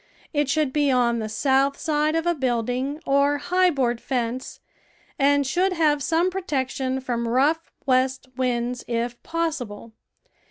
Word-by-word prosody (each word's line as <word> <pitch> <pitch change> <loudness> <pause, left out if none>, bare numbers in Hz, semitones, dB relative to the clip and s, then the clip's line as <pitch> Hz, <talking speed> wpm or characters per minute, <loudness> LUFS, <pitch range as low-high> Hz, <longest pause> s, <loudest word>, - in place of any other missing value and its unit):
It 290 -2 +1
should 295 -2 +1
be 290 -2 +2
on 240 -2 +2
the 215 -1 -4
south 275 +4 +2
side 305 -1 +1
of 325 0 0
a 345 - +3
building 255 +1 -1
or 280 +1 +3
high 365 +5 +2
board 245 -6 0
fence, 250 -1 -3 0.6
and 285 0 +3
should 365 +8 +1
have 305 -4 +2
some 340 +4 +1
protection 265 -7 -2
from 240 -3 -2
rough 285 +7 +1
west 260 0 +1
winds 245 -1 -1
if 240 0 -2
possi 330 -6 -2
ble. 205 +2 -11
270 Hz, 150 wpm, -24 LUFS, 245-305 Hz, 0.6 s, a